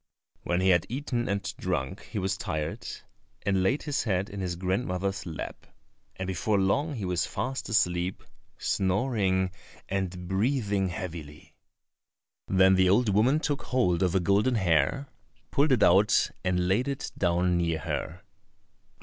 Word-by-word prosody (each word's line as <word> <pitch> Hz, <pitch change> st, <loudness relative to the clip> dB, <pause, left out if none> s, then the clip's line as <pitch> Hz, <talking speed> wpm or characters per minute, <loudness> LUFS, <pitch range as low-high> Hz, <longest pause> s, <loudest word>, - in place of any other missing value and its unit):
When 90 Hz, +1 st, 0 dB
he 95 Hz, -, +3 dB
had 85 Hz, -2 st, +3 dB
eaten 125 Hz, -1 st, -2 dB
and 100 Hz, 0 st, -1 dB, 0.2 s
drunk 65 Hz, 0 st, -2 dB
he -, -, -7 dB
was 95 Hz, -1 st, 0 dB
tired, 80 Hz, +3 st, -4 dB, 0.6 s
and 95 Hz, -2 st, +2 dB
laid 95 Hz, +10 st, +1 dB
his 145 Hz, -2 st, -1 dB
head 95 Hz, -3 st, -1 dB
in 100 Hz, -, -6 dB
his 90 Hz, -2 st, -2 dB
grandmother's 95 Hz, +1 st, -2 dB
lap, 80 Hz, -, -7 dB, 0.5 s
and 95 Hz, -, -4 dB
before 100 Hz, +3 st, 0 dB
long 140 Hz, +11 st, +1 dB
he 105 Hz, -5 st, -4 dB
was 90 Hz, -1 st, 0 dB
fast 125 Hz, +2 st, -3 dB
asleep, 90 Hz, -3 st, +1 dB, 0.3 s
snoring 95 Hz, -2 st, +1 dB, 0.4 s
and 95 Hz, -2 st, -3 dB
breathing 100 Hz, -1 st, +1 dB
heavily. 85 Hz, -6 st, -7 dB, 0.9 s
Then 95 Hz, 0 st, +5 dB
the 95 Hz, -1 st, +4 dB
old 110 Hz, +4 st, +4 dB
woman 115 Hz, +9 st, +3 dB
took 145 Hz, -2 st, -1 dB
hold 95 Hz, -9 st, +1 dB
of 90 Hz, -1 st, +1 dB
a -, -, +5 dB
golden 100 Hz, +8 st, +2 dB
hair, 90 Hz, -, +2 dB, 0.4 s
pulled 145 Hz, +1 st, +3 dB
it 125 Hz, -4 st, +4 dB
out, 100 Hz, +5 st, +4 dB
and 90 Hz, -1 st, +1 dB
laid 105 Hz, +8 st, +1 dB
it 140 Hz, -1 st, -3 dB
down 90 Hz, 0 st, +2 dB
near 85 Hz, -2 st, 0 dB
her. 85 Hz, +3 st, -4 dB
95 Hz, 150 wpm, -28 LUFS, 90-110 Hz, 0.9 s, Then